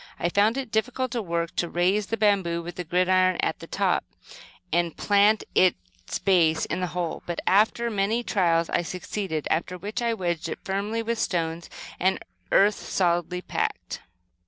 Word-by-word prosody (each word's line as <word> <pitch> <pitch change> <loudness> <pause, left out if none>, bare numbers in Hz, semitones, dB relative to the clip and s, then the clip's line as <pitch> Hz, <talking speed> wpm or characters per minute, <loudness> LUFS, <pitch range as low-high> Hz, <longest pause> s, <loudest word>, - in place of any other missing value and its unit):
I 175 - 0
found 210 +6 +2
it 265 -5 -4
difficult 250 +3 -1
work 170 -7 -2
to 175 - 0
raise 190 +4 +1
the 225 - -2
bamboo 190 -6 +1
with 175 +1 -6
the 180 - -3
gridiron 185 +2 +2
at - - -1
the - - -10
top, - - +1 0.7
and 170 -1 +1
plant 205 +1 +3
its 90 - 0
base 170 -5 +3
in - - -3
the 180 - -1
hole, 170 -2 -2
but, 175 - -3
after 220 +4 +3
many 215 +3 0
trials, 170 -6 +2
I - - +2
succeeded, 180 -2 -4
after 180 +2 -1
which 205 +6 -4
I 235 -1 +1
wedged 175 -4 -2
it - - -4
firmly 205 +4 -2
with 230 0 -2
stones 165 -1 -2 0.3
and 190 +2 +2 0.3
earth 205 +2 +5
solidly 175 0 0
packed. - - -3
185 Hz, 165 wpm, -25 LUFS, 170-210 Hz, 0.7 s, earth